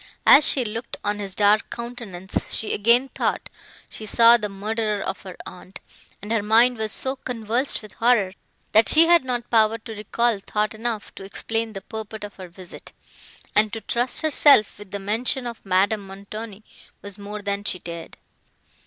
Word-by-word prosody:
As 300 +2 +8
she 255 -3 +4
looked 230 +2 -6
on 205 0 -2
his 195 -2 -5
dark 210 +1 +3
countenance, 230 -6 -5
she 220 - -1
again 235 +5 +3
thought - - -2 0.4
she 215 - -7
saw 230 +2 +6
the 210 -3 -2
murderer 210 +1 -2
of 190 -1 -5
her 185 -2 -10
aunt; 185 +1 -11 0.4
and 210 - -6
her 225 -2 +1
mind 230 +4 +4
was 220 -1 -2
so 265 +4 -1
convulsed 245 0 -1
with 210 - -12
horror, 230 -5 +2 0.4
that 220 +1 +5
she 320 +1 +7
had 340 -2 +5
not 245 -2 -3
power 220 -1 +3
to 225 0 -10
recall 220 +1 -1
thought 210 +2 -2
enough 220 -1 -4
to - - -10
explain 225 +3 -3
the 195 - -7
purport 220 -1 -8
of 205 - -8
her 185 -1 -9
visit; 180 +1 -12 0.6
and 215 0 +3
to 225 - -5
trust 240 +3 -1
herself 285 -9 +4
with 205 -2 -12
the 200 - -4
mention 230 +6 -2
of 235 -1 -7
Madame 195 +2 +1
Montoni 200 +2 -9 0.4
was 200 0 -7
more 205 +1 -7
than 200 0 -2
she 185 - -1
dared. 170 -2 -9
215 Hz, 180 wpm, -23 LUFS, 200-235 Hz, 0.6 s, As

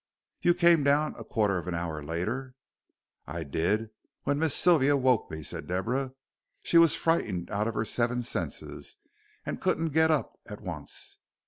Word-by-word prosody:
"You 175 0 +4
came 170 -3 +5
down 145 +2 +2
a - - -8
quarter 105 -5 +1
of 85 - -9
an 90 - -2
hour 85 -3 -3
later?" 110 - -3 0.7
"I 85 - -4
did, 95 +10 -1 0.3
when 145 +1 0
Miss 160 -2 +2
Sylvia 145 -5 +4
woke 130 -3 +2
me," 80 -1 -6
said - - -6
Deborah; 125 +9 -1 0.5
"she 170 - +5
was 165 -2 +6
frightened 105 - 0
out 105 +1 0
of 115 - -3
her 110 - 0
seven 120 +2 0
senses, - - -5 0.5
and - - -4
couldn't 165 +1 +1
get 160 +2 +3
up 155 -3 0
at 105 -2 -8
once. 85 -8 -6
120 Hz, 165 wpm, -28 LUFS, 90-150 Hz, 0.7 s, was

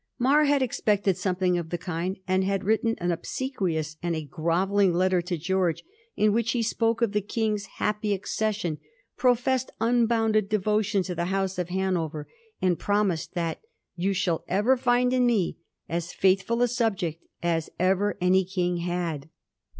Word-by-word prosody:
Mar 280 +4 +4
had 285 -2 +3
expected 205 -5 +1
something 180 -1 0
of 165 -2 -6
the 175 - -2
kind, 175 +2 -3
and 185 0 +2
had 195 0 -1
written 220 +2 +1
an 175 0 -1
obsequious 170 - -3
and 170 -1 -1
a 160 - -3
grovelling 180 +5 +1
letter 185 0 +2
to 175 0 -3
Greorge, 180 0 0 0.3
in 210 -1 +3
which 230 0 +1
he 240 -2 0
spoke 230 +1 +1
of 225 - +2
the 210 0 0
King's 210 0 -1
' - - -20
happy 210 0 -1
accession,' 200 -4 -1 0.4
pro 250 -1 +4
fessed 260 +1 -1
unbounded 225 -3 +2
devotion 210 -1 +1
to 180 - -4
the 170 0 -2
House 190 0 -1
of 180 -1 -2
Hanover, 175 -5 -2 0.3
and 180 -2 +1
promised 200 -5 0
that 170 -2 -2 0.2
' - - -55
You 185 +3 0
shall 180 -3 0
ever 210 +8 +3
find 245 0 +2
in 250 -1 +3
me 215 -7 +1 0.3
as 170 +1 -3
fedthfrd 195 +5 +2
a - - +4
subject 200 -9 -1 0.2
as 165 -2 0
ever 190 +3 +2
any 185 +1 +3
king 180 -1 -1
had.' 170 -4 -3
190 Hz, 170 wpm, -26 LUFS, 175-220 Hz, 0.4 s, Mar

